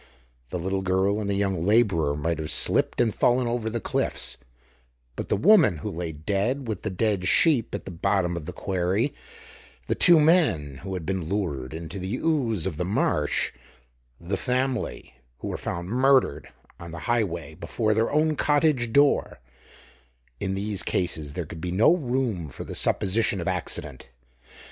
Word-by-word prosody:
The - - -3
little 95 +3 -2
girl 95 +3 +1
and 100 - -3
the 100 - 0
young 95 -4 -1
laborer 95 -8 +2
might 80 +2 -2
have 80 0 -3
slipped - - +3
and 115 -3 +2
fallen 125 +1 +2
over 120 -1 -2
the 115 +1 -3
cliffs, - - -2 0.8
but - - -6
the - - +2
woman 180 - +5
who 75 - -5
lay 85 0 -4
dead 100 - -2
with 110 -5 -3
the - - -3
dead 95 -1 0
sheep 135 - +3
at - - -7
the 95 - -6
bottom 90 0 0
of 80 -2 -6
the - - -4
quarry, 95 +9 -1 0.7
the - - 0
two 175 -2 +6
men 150 - +2
who 95 +6 -6
had 90 -3 -5
been 95 -3 -3
lured 80 -11 -2
into 80 +3 -6
the 95 +5 -3
ooze 125 - 0
of 90 -6 -3
the 90 - -1
marsh, 85 - 0 0.7
the 95 +3 -3
family 125 - -2 0.2
who - - -6
were - - -3
found 85 0 -4
murdered 130 - +2 0.3
on 85 - -9
the 85 0 -8
Highway 85 -10 -1
before 110 +7 -1
their 110 +2 +1
own 155 +1 +2
cottage 145 -6 +2
door; 140 +3 +3 1.0
in 95 - -2
these 100 0 -1
cases 80 -5 -2
there 90 - -3
could 80 +1 -9
be 90 - -3
no 110 - +4
room 120 - -2
for 65 - -7
the - - -7
supposition 100 0 +1
of 85 - -4
accident. 75 -7 -3
95 Hz, 170 wpm, -25 LUFS, 85-120 Hz, 1.0 s, two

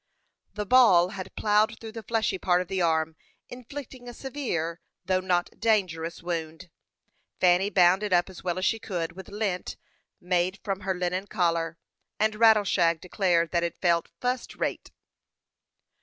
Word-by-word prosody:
The 210 0 -3
ball 195 -7 +6
had 190 -2 -8
ploughed 215 +1 +2
through 225 -1 -8
the 225 0 -7
fleshy 220 -3 -1
part 180 -1 +2
of 180 - -3
the 190 -1 -1
arm, 160 -1 +1 0.3
inflicting 250 0 -9
a 240 - -10
severe, 200 - -3 0.2
though 185 -1 +2
not 180 -1 0
dangerous, 170 -7 0
wound. 165 0 -5 0.7
Fanny 180 +2 +4
bound 185 -1 +4
it 210 -2 -3
up 175 -1 +3
as 190 -2 -11
well 180 -1 -2
as 185 - -1
she 225 - +1
could, 175 -6 -3
with 190 +1 -11
lint 200 -3 -3 0.4
made 180 +1 0
from 195 -2 -2
her 190 0 -2
linen 180 +2 -2
collar, 170 -4 0 0.4
and 215 0 +2
Rattleshag 205 -7 +4
declared 175 -2 +1
that 170 - +1
it 170 -1 -3
felt 170 -2 +1
"fust 250 0 -2
rate." - - -3
185 Hz, 155 wpm, -27 LUFS, 175-215 Hz, 0.7 s, ball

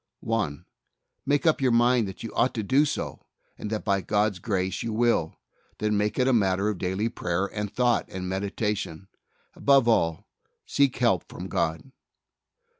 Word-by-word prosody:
1. 105 -11 -2 0.6
Make 145 +2 +2
up 160 -3 +3
your 130 - +3
mind 120 -1 +3
that 95 - -8
you 115 - -6
ought 130 - +1
to 110 - -2
do 135 +8 +3
so, - - -4 0.3
and 105 - -6
that 110 0 -3
by 100 -2 +2
God's 105 -1 0
grace 95 -2 -1
you 115 - -3
will; 110 -8 +1 0.4
then, 105 0 0
make 105 +1 0
it 130 - +2
a 130 - +4
matter 100 -2 +2
of 105 -4 -3
daily 95 +4 -1
prayer 90 -4 -1
and 105 0 -4
thought 125 -2 +1
and 90 -1 -5
meditation. 100 -1 -3 0.4
Above 140 -3 +4
all, 85 -8 +2 0.4
seek 140 -2 +2
help 115 -9 +2
from - - -7
God. 80 +12 -2
105 Hz, 170 wpm, -26 LUFS, 95-120 Hz, 0.6 s, a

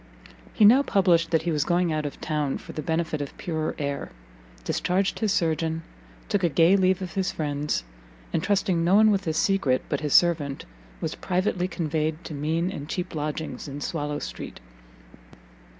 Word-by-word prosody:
He 215 - +4
now 245 +6 +8
published 180 -9 +3
that 160 -1 +2
he 170 - 0
was 150 -2 +1
going 175 0 +1
out 155 -1 -1
of 145 - -9
town 150 -3 -1
for - - -11
the 155 - -4
benefit 160 -1 -1
of 140 - -6
purer 160 -2 -2
air, 140 -2 -3 0.5
discharged 185 - 0
his 215 -3 +1
surgeon, 160 -2 0 0.4
took 200 -2 0
a 175 - +4
gay 165 +6 +5
leave 190 -1 +2
of 180 - -6
his 190 -2 0
friends, 145 - -2 0.5
and 165 - +1
trusting 195 -4 +1
no 180 +3 +4
one 215 +1 +6
with 200 -1 0
his 160 -1 -1
secret 170 -10 +2
but 145 - 0
his 150 -2 +1
servant, 155 -5 +3 0.4
was - - -2
privately 180 0 -1
conveyed 160 -1 -2
to 160 - -7
mean 160 +5 -1
and 145 -6 -7
cheap 180 +1 -3
lodgings 150 -3 -4
in 140 0 -6
Swallow 150 -1 -3
street. - - -7
165 Hz, 180 wpm, -26 LUFS, 150-185 Hz, 0.5 s, now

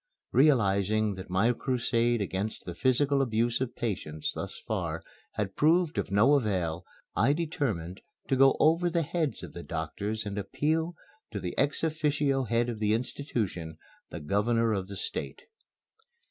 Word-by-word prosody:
Realizing 110 -6 +3
that 95 -1 -8
my 100 +7 +3
crusade 120 -2 +1
against 100 +2 -3
the 90 - -5
physical 135 +7 +2
abuse 120 -1 +1
of 130 -2 -2
patients 80 -9 -3
thus - - -6
far - - -3 0.3
had 100 -2 -3
proved 165 +1 +3
of - - -2
no 105 +9 +5
avail, 90 - 0 0.3
I 130 +7 +4
determined 125 - -2 0.3
to 135 - +2
go 135 +1 +5
over 165 +3 +4
the 170 -1 +1
heads 160 -1 -2
of - - -8
the 85 - -7
doctors 100 +7 -4
and 100 0 -3
appeal 160 - -1 0.3
to 105 - -4
the 90 -2 -4
ex 145 +3 +1
officio 145 -4 +1
head 115 +1 +1
of 115 -3 -4
the 105 0 +2
institution, 110 - -3 0.3
the - - -6
Governor 110 +8 +1
of 95 -2 -2
the 100 0 -7
State. - - -5
115 Hz, 155 wpm, -29 LUFS, 100-140 Hz, 0.3 s, no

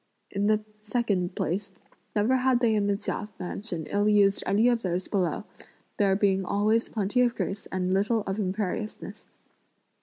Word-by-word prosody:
In 200 +1 0
the 215 0 +2 0.2
second 210 -5 -1
place, 195 +4 -2 0.5
never 215 +5 +3
had 255 -1 +3
they 235 -3 +3
in 205 -1 +1
the 200 -1 +1
Chia 210 +1 -4
mansion 180 -2 -3
ill 205 +4 +1
used 200 -1 +4
any 210 +5 +4
of 240 -2 +2
those 180 -1 -2
below; 185 -5 0 0.5
there 195 -2 +3
being 195 -1 +2
always 215 +5 +1
plenty 210 +3 0
of 240 -1 +2
grace 200 - -3
and 185 0 -1
little 215 +4 +2
of 195 +1 -3
imperiousness. 205 +2 -4
205 Hz, 160 wpm, -27 LUFS, 190-220 Hz, 0.5 s, used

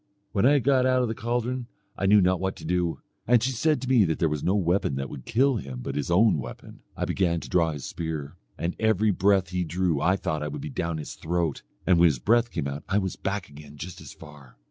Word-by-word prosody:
When 100 +5 +3
I 145 +1 +5
got 130 -1 +3
out 130 -1 +3
of - - 0
the - - -1
caldron 120 +2 -2 0.3
I 95 - -1
knew 105 +1 +6
not 90 -1 +2
what 95 0 -2
to - - -11
do; 85 -3 -1 0.3
and 120 -1 +4
she 130 - +1
said 150 +5 +1
to - - -4
me 125 -4 +5
that 80 -2 -1
there 85 - +1
was 75 -1 -3
no 95 - +2
weapon 90 -6 +1
that 70 0 -4
would 65 -4 -9
kill 130 +2 +2
him 65 - -6
but - - -4
his 75 +2 -3
own 95 -1 +4
weapon. - - -9 0.2
I - - -1
began 85 -3 0
to - - -9
draw 85 -2 +2
his 75 -3 -7
spear, 80 -3 -5 0.2
and 85 +3 -2
every 110 -1 +3
breath 100 +1 +3
that 85 - -18
he 90 0 0
drew 85 -2 0
I 90 - +3
thought 80 -5 -2
I 75 - -2
would 145 - -5
be 150 0 -6
down 85 -9 -2
his 75 - -6
throat, 85 -3 -2 0.2
and 90 -2 +4
when 85 - +7
his 75 -5 +1
breath 115 - +2
came 80 -9 -3
out 70 +1 -5
I 100 - +2
was 95 -3 -1
back 95 -1 -3
again 75 0 -13
just 90 +4 -8
as - - -10
far. 75 -5 -14
90 Hz, 260 wpm, -26 LUFS, 80-110 Hz, 0.3 s, when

